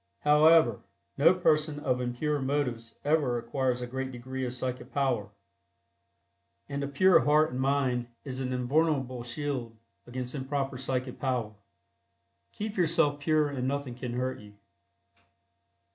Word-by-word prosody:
However, 150 -5 +5 0.4
no 155 +5 +6
person 155 -4 +1
of 130 -4 0
impure 140 +4 -1
motives 125 -5 -2
ever 145 -5 +2
acquires 125 +1 -1
a - - -2
great 130 +2 -4
degree 130 +2 -5
of 120 - -5
psychic 125 0 -4
power, 130 -8 0 1.4
and 140 0 -3
a - - -1
pure 175 +6 +5
heart 150 0 +3
and 125 - -4
mind 130 -3 +1 0.2
is 130 -1 -4
an 130 -1 -2
invulnerable 130 0 0
shield 120 -2 -4 0.3
against 125 0 -5
improper 135 -1 -3
psychic 130 -1 -3
power. 125 -5 -1 1.0
Keep 215 0 -5
yourself 165 -4 +2
pure 155 0 +2
and 130 -2 -2
nothing 140 -2 -2
can 125 0 -5
hurt 130 +1 -2
you. 105 -1 -14
130 Hz, 135 wpm, -29 LUFS, 125-145 Hz, 1.4 s, no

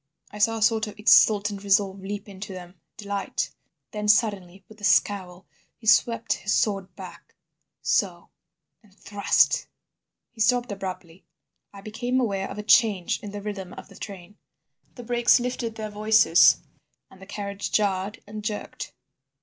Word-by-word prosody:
I 210 - -9
saw 225 +2 +2
a - - -6
sort 220 -1 +2
of 210 - -10
exultant 210 -1 +4
resolve 200 -1 +2
leap 205 +2 -6
into 195 0 -8
them—delight. 185 +3 -6 0.4
Then, 210 -1 -4
suddenly, 200 -4 +1
with 220 -1 -17
a - - -15
scowl, 195 -3 +1 0.3
he 235 - -17
swept 230 +1 +3
his 205 +2 -2
sword 195 -4 -1
back—so—and 180 0 -6
thrust." 200 0 +1 0.6
He 230 - -8
stopped 245 0 +2
abruptly. 185 -3 -7 0.5
I 200 - -12
became 240 +5 -2
aware 195 -6 -1
of - - -8
a 210 - -5
change 210 -5 +3
in 205 - -8
the 205 0 -7
rhythm 195 -3 -6
of - - -11
the - - -16
train. 200 0 -10 0.6
The 245 - -9
brakes 240 +1 +3
lifted 240 -2 -3
their 215 -1 -6
voices 210 -5 +5 0.5
and 190 - -17
the 195 - -12
carriage 200 0 -5
jarred 200 0 -1
and 210 +1 -8
jerked. 210 -1 -5
205 Hz, 145 wpm, -25 LUFS, 195-215 Hz, 0.6 s, voices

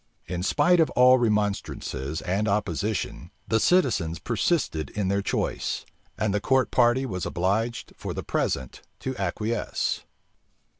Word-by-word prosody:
In 90 -1 -4
spite 175 - +3
of 160 - +4
all 125 +1 +7
remonstrances 100 - -1
and 95 +4 0
opposition, 100 -1 -1 0.2
the 110 - +2
citizens 115 - +2
persisted 105 - 0
in 100 -3 -2
their 100 +1 +1
choice; - - -2 0.3
and 105 -2 0
the 105 - 0
court 130 +3 +2
party 125 +2 +3
was 90 -8 -4
obliged 110 +7 -1
for - - -5
the - - -4
present 65 - -2 0.2
to 130 0 -3
acquiesce. 105 +4 -2
105 Hz, 135 wpm, -26 LUFS, 90-120 Hz, 0.3 s, all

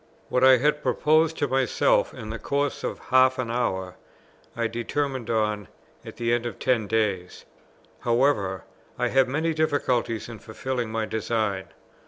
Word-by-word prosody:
What 125 - +1
I 130 0 +8
had 150 +4 +1
proposed 155 +2 +2
to 145 - 0
myself 130 -2 +2
in 110 - -8
the 115 - -5
course 140 0 -1
of - - -3 0.2
half 130 0 +5
an 125 -3 -2
hour, 95 -7 -2 0.6
I 115 - 0
determined 120 +2 -2
on 105 -3 0 0.4
at - - -10
the 120 0 0
end 120 0 0
of 120 - -7
ten 115 -5 +1
days. 100 -5 -1 0.5
However, 115 -6 +1 0.3
I - - 0
have 135 0 +4
many 155 +5 0
difficulties 145 -7 0
in 115 -3 -9
fulfilling 120 +1 -4
my 110 0 -1
design. 110 -3 -1
120 Hz, 155 wpm, -25 LUFS, 110-135 Hz, 0.6 s, I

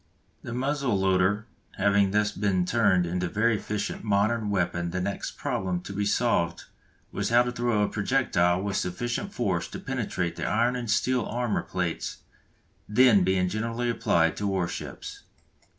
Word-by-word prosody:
The - - -7
muzzle 135 -2 0
loader 95 +2 +2 0.3
having 100 0 +3
thus 105 +1 +1
been 95 -3 0
turned 100 -4 +3
into 90 +1 -1
a - - -6
very 110 +4 +2
efficient 105 0 -4
modern 105 +1 +1
weapon 85 -3 0
the 90 +2 -3
next 100 +2 -4
problem 90 -2 -2
to 100 - -8
be 100 +1 -1
solved 100 -6 +1 0.5
was 100 0 -2
how 120 +1 +5
to 125 - -2
throw 120 -3 +1
a - - +2
projectile 100 -6 +1
with 100 -1 -1
sufficient 120 - -2
force 95 - -1
to - - -8
penetrate 90 -2 -3
the - - -3
iron 120 +3 +2
and 120 -2 -4
steel 125 +2 +2
armour 120 -1 -1
plates 90 -3 -3 0.7
then 110 -3 +5
being 90 0 +2
generally 115 +4 -1
applied 85 -9 +2
to 100 - -1
war 95 -3 0
ships. 85 - -7
100 Hz, 165 wpm, -27 LUFS, 90-115 Hz, 0.7 s, how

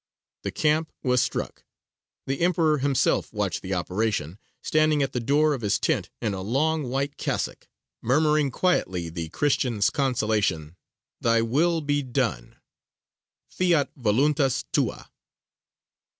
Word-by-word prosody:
The - - -4
camp 155 +1 +1
was 125 -2 +3
struck: - - -3 0.6
the 135 0 -2
Emperor 165 -4 +2
himself 135 -1 +1
watched 105 -3 -2
the 95 0 -3
operation, 95 -1 -2 0.2
standing 155 -2 +2
at 135 - -3
the 125 - -1
door 145 +5 +2
of 135 - -4
his 105 -2 +1
tent - - 0
in 110 -4 -1
a 95 - -4
long 140 +7 0
white 140 +2 -2
cassock, - - -3 0.3
murmuring 150 +3 +2
quietly 95 - 0
the 80 -1 -5
Christian's 120 - +1
consolation: 110 - 0 0.4
"Thy 115 0 +2
will 160 +8 +1
be 145 -1 0
done" 120 - -2 1.0
_Fiat 170 -6 +2
voluntas 135 +3 +1
Tua! - - -1
130 Hz, 125 wpm, -25 LUFS, 105-150 Hz, 1.0 s, was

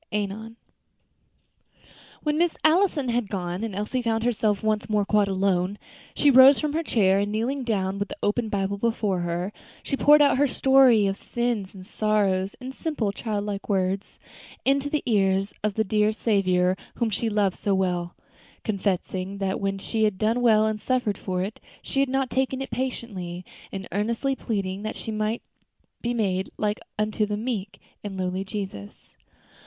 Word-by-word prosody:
ANON. 210 +2 -3 1.7
When 300 0 0
Miss 345 -1 +2
Allison 315 -5 +3
had 235 -3 0
gone, 180 0 -3
and 220 -4 -4
Elsie 210 +5 -2
found 225 -1 0
herself 220 -4 +1
once 215 -1 0
more 210 -1 +2
quite 210 0 +3
alone, 190 0 0 0.4
she 290 - +5
rose 265 +2 +8
from 300 -1 -1
her 325 - +1
chair, 195 - +3
and 205 +1 -1
kneeling 250 +6 -1
down 200 -4 -1
with 200 - -1
the - - -8
open 220 +2 0
Bible 200 0 -1
before 215 -4 0
her, 175 +3 -2 0.3
she - - -1
poured 295 +2 +6
out 285 -2 +4
her 290 - +4
story 265 -5 +5
of 195 0 0
sins 235 -5 -2
and 185 -1 -10
sorrows, 200 -3 0
in 255 0 -6
simple, 265 -8 -2
child 205 -1 -3
like 205 0 -5
words, 195 0 -1 0.5
into 275 +1 +2
the 300 0 -1
ears 195 -3 +2
of 210 -2 0
the 220 - +2
dear 210 +1 +2
Saviour 185 -5 +2 0.2
whom 235 -2 0
she 225 +3 -1
loved 205 -3 +1
so 200 -1 0
well; 180 -2 -1 0.5
confessing 195 -1 -2
that 195 -1 -1
when 195 0 -1
she 220 +3 0
had 210 -3 0
done 225 +4 +1
well 220 -3 +5
and 215 -1 -1
suffered 250 -5 0
for 185 -1 -2
it, 205 +3 -6 0.2
she 275 - -2
had 275 -1 +2
not 270 -1 0
taken 265 0 0
it 270 - -5
patiently, 195 -9 -4 0.3
and 195 -1 -6
earnestly 230 +7 0
pleading 200 -6 -3
that 215 +1 -4
she 225 - -5
might 215 +2 -2 0.6
be 240 - -1
made 190 -4 0
like 210 0 -1 0.2
unto 215 0 0
the 205 0 -2
meek 210 -4 -4 0.2
and 200 -2 -5
lowly 185 +1 -2
Jesus. 195 - -7
210 Hz, 175 wpm, -25 LUFS, 195-240 Hz, 1.7 s, rose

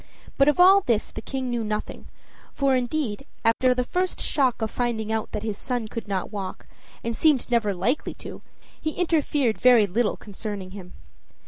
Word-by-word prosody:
But 275 - +4
of 295 +3 +3
all 380 +2 +8
this 235 - 0
the - - -7
King 260 +1 -4
knew 235 -1 -1
nothing, 215 0 -4 0.5
for, 275 -2 +2
indeed, 255 -1 -2 0.2
after 250 +3 +3
the 250 - +1
first 365 +8 -2
shock 260 -5 +1
of 220 - -2
finding 225 -3 -2
out 220 -1 -2
that 210 - -4
his 215 -2 -3
son 245 -3 -2
could 230 0 -6
not 195 -1 -2
walk, 195 -3 -6 0.4
and 230 0 -2
seemed 280 -2 +2
never 225 -4 +2
likely 200 - -1
to - - -9 0.4
he 310 -1 -2
interfered 295 -8 +1
very 245 -4 +7
little 210 +4 0
concerning 205 -2 -7
him. 185 -2 -10
235 Hz, 180 wpm, -25 LUFS, 210-270 Hz, 0.5 s, all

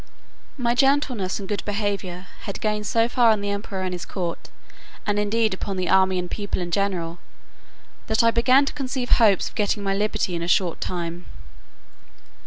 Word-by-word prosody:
My 240 -3 +1
gentleness 260 -7 +2
and 195 - -6
good 205 0 -2
behaviour 200 -3 -3 0.2
had 200 - -4
gained 210 -1 -1
so 230 +2 +3
far 240 -1 +4
on 215 -2 +3
the 205 0 -2
emperor 200 -2 -4
and 185 -1 -2
his 175 - -5
court, 175 -3 -5 0.6
and 205 0 +1
indeed 215 +1 +1
upon 190 0 -4
the 185 -1 -1
army 190 -1 +4
and 180 - -1
people 205 -2 -3
in 175 -1 -4
general, 175 -3 -1 0.9
that 220 +1 +2
I 230 - +5
began 255 +4 +4
to - - -3
conceive 260 -3 -3
hopes 210 -5 +4
of - - -22
getting 205 0 0
my 195 0 0
liberty 205 -2 0
in 170 - -2
a 170 - -3
short 175 -1 +1
time. 175 -1 -4
200 Hz, 185 wpm, -24 LUFS, 185-225 Hz, 0.9 s, I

